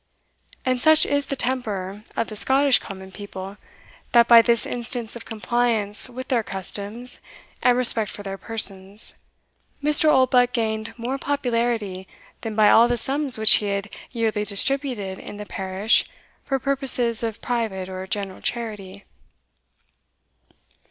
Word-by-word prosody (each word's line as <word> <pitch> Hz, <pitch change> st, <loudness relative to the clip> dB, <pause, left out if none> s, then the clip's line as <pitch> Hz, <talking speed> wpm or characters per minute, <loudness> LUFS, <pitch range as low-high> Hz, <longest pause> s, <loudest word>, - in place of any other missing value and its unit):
And 255 Hz, -1 st, 0 dB
such 315 Hz, 0 st, +5 dB
is 285 Hz, 0 st, 0 dB
the 275 Hz, -, -2 dB
temper 210 Hz, -7 st, -3 dB
of 230 Hz, -, +1 dB
the 215 Hz, -, -8 dB
Scottish 265 Hz, +4 st, +4 dB
common 190 Hz, -1 st, -10 dB
people, 195 Hz, 0 st, -8 dB, 0.6 s
that, 235 Hz, -1 st, +6 dB
by 235 Hz, -1 st, +9 dB
this 235 Hz, 0 st, +1 dB
instance 240 Hz, -1 st, -4 dB
of 235 Hz, -, -9 dB
compliance 225 Hz, -1 st, +1 dB
with 255 Hz, +1 st, -8 dB
their 245 Hz, -3 st, +2 dB
customs, 205 Hz, +5 st, -5 dB, 0.4 s
and 245 Hz, -1 st, +3 dB
respect 230 Hz, -4 st, +4 dB
for 205 Hz, -, -8 dB
their 195 Hz, -1 st, -6 dB
persons, 200 Hz, -2 st, +1 dB, 0.7 s
Mr. 300 Hz, +1 st, +3 dB
Oldbuck 255 Hz, -2 st, +3 dB
gained 220 Hz, -1 st, -2 dB
more 250 Hz, +4 st, -4 dB
popularity 230 Hz, -9 st, -2 dB, 0.3 s
than 220 Hz, -1 st, -5 dB
by 215 Hz, -1 st, +5 dB
all 230 Hz, +1 st, +6 dB
the 240 Hz, 0 st, 0 dB
sums 270 Hz, +1 st, +2 dB
which 220 Hz, -2 st, +5 dB
he 210 Hz, -, -3 dB
had 200 Hz, +1 st, -4 dB, 0.2 s
yearly 225 Hz, -3 st, -1 dB
distributed 210 Hz, -2 st, -1 dB
in 205 Hz, -, -9 dB
the 210 Hz, -, -7 dB
parish 190 Hz, +2 st, 0 dB, 0.4 s
for 270 Hz, -, 0 dB
purposes 260 Hz, -4 st, +1 dB
of 225 Hz, -2 st, -4 dB
private 220 Hz, -7 st, -3 dB
or 190 Hz, 0 st, -7 dB
general 195 Hz, -1 st, -4 dB
charity. 205 Hz, -5 st, -5 dB
225 Hz, 140 wpm, -23 LUFS, 200-250 Hz, 0.7 s, by